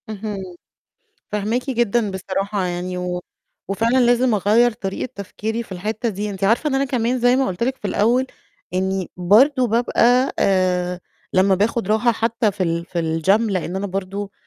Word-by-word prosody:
اهم. 210 -1 -5 1.0
فاهماكِ 220 +6 -1
جدًا 235 -3 +1
بصراحة 195 +1 -2
يعني 180 +1 -3
و 180 0 -3 0.5
وفعلًا 230 +6 +1
لازم 245 0 +3
أغيَّر 215 +5 +3
طريقة 205 +4 -5
تفكيري 220 +3 -4
في 215 - -11
الحتّة 215 +6 -3
دي. 210 0 -3
أنتِ 195 0 -4
عارفة 230 +9 +2
إن - - -1
أنا 270 +1 +2
كمان 250 -2 0
زَي 245 +1 +4
ما 270 - +2
قُلت 190 +2 -4
لِك 260 +2 0
في - - -34
الأول 240 +5 +2 0.5
إني 190 0 -1
برضو 245 +9 +4
بابقى 245 +2 +2
آآ، 180 -2 +1 0.3
لمّا 190 +1 +4
باخد 210 +1 0
راحة 220 +3 +3
حتى 230 0 0
في 190 - -3
ال 170 -1 -1
في 165 -2 -2
الgym 195 +6 +4
لأن 185 -1 -2
أنا 195 +1 -2
برضو 195 +1 -4
205 Hz, 165 wpm, -21 LUFS, 190-235 Hz, 1.0 s, زَي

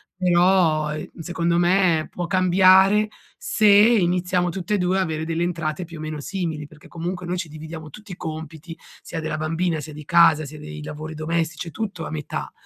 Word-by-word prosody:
però 175 -4 +3 0.3
secondo 170 0 -1
me 175 -2 +3
può 175 -1 -4
cambiare 190 +3 +5 0.3
se 485 - -1
iniziamo 185 -4 +4
tutte 190 +4 -2
e - - +1
2 185 0 +1
ad 190 - +2
avere 160 -2 -3
delle 165 +1 -2
entrate 165 -1 -2
più 170 -1 -10
o - - -8
meno 155 -1 -5
simili, 160 -2 -4
perché 155 +3 -17
comunque 175 +2 -5
noi 180 +1 -2
ci 175 -3 -4
dividiamo 155 0 -9
tutti 210 +3 -13
i - - -5
compiti, 160 +1 -7 0.2
sia 165 - -6
della 155 -1 -3
bambina, 160 +1 -1
sia 150 +1 -8
di 150 -1 -10
casa, 165 -2 +5
sia 150 +2 -10
dei 75 - -8
lavori 155 - -7
domestici, 165 +1 -2
tutto 195 -6 -5
a - - -6
metà, 155 -2 -5
170 Hz, 185 wpm, -23 LUFS, 155-185 Hz, 0.3 s, cambiare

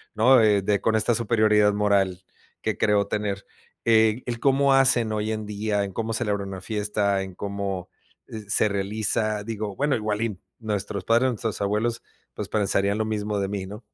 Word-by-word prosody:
¿no? 125 +4 +6
De 105 -3 +4
de 100 0 +1
con 110 - +1
esta 110 +1 +2
superioridad 105 -2 +3
moral 100 -3 +1 0.4
que - - -2
creo 105 -1 +2
tener. 100 -2 -3 0.4
El 115 +1 +2
cómo 140 0 +3
hacen 130 -4 +4
hoy 105 +1 -1
en 110 -1 -3
día, 105 0 -1
en 95 - -8
cómo 115 0 -3
celebra 105 -3 -1
una 95 -1 -6
fiesta, 105 -1 -1
en 95 - -8
cómo, 100 -2 -4 0.4
eh, 110 - -7
se 110 - +3
realiza, 105 +1 -1
digo, 110 -3 -4
bueno, 145 +3 +1
igual 105 -1 -2
y 110 -5 -2 0.2
nuestros 100 -3 -3
padres, 120 +3 +3
nuestros 115 -2 -4
abuelos, 105 +4 -1 0.3
pues, - - -6
pensarían 100 -1 +1
lo 110 - 0
mismo 105 -1 -2
de 100 - -1
mí, 100 -2 -4
¿no? 105 +4 -9
105 Hz, 175 wpm, -24 LUFS, 100-110 Hz, 0.4 s, no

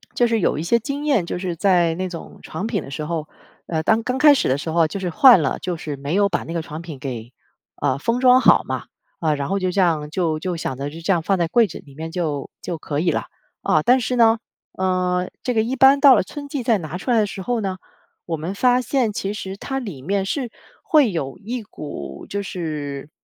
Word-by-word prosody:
就 240 - +3
是 230 -1 +1
有 175 - +1
一 155 - -2
些 235 +8 +3
经 280 +5 -4
验， 265 - +2
就 175 - -4
是 180 -1 -3
在 175 -3 +3
那 185 +2 -2
种 175 -2 -9
床 195 - -5
品 215 -6 -1
的 - - -10
时 150 +3 -5
候， 155 -1 -3 0.4
呃， 160 -2 -1
当 220 +6 +3
刚 250 +3 -2
开 295 +1 +7
始 275 - +1
的 130 - +2
时 155 - -5
候 165 0 +3
就 195 - -5
是 185 -2 -2
换 235 +3 +7
了， 150 - -1
就 180 -1 -3
是 150 -3 -6
没 140 +5 -3
有 200 0 +3
把 175 - -1
那 165 - -6
个 170 - -1
床 160 0 -7
品 160 -5 -9
给， 120 -3 -6 0.5
呃， 130 - +1
封 230 - 0
装 255 0 +7
好 - - +6
嘛。 - - -4 0.3
啊， 160 -2 +1
然 140 -1 -3
后 195 - +1
就 185 -2 0
这 195 - +1
样， 155 -4 +1
就 165 -3 0
就 180 +3 -3
想 140 -5 -4
着 140 +2 -4
就 165 +2 -9
这 180 - 0
样 170 -4 +1
放 190 +2 +1
在 170 - +2
柜 230 +7 +4
子 - - -8
里 140 -2 -16
面 160 +2 -6
就 160 -5 -3
就 170 - -4
可 145 -2 -3
以 170 +2 +1
了， - - -1 0.4
啊， - - +3
但 250 +2 +4
是 250 +1 -1
呢， 230 -1 +5 0.4
呃， 185 -1 0
这 250 - -2
个 220 - +3
一 245 +4 -2
般 270 +1 +6
到 275 -1 +8
了 220 - +4
春 285 +9 -8
季 280 -1 -3
再 230 -2 +2
拿 170 0 -6
出 255 - -6
来 235 -2 +4
的 215 - +3
时 195 -1 -6
候 240 +4 -1
呢， 190 -3 -3 0.5
我 165 -2 -2
们 165 +5 -4
发 250 +4 +3
现 255 -3 0
其 200 -2 -3
实 195 -2 -6
它 270 +5 -3
里 190 - -7
面 195 +5 0
是 240 +4 -3 0.3
会 290 -8 +4
有 140 -6 -4
一 230 +3 -5
股 70 - -8
就 200 0 -3
是， 150 -7 -5
185 Hz, 270 characters per minute, -21 LUFS, 160-230 Hz, 0.5 s, 到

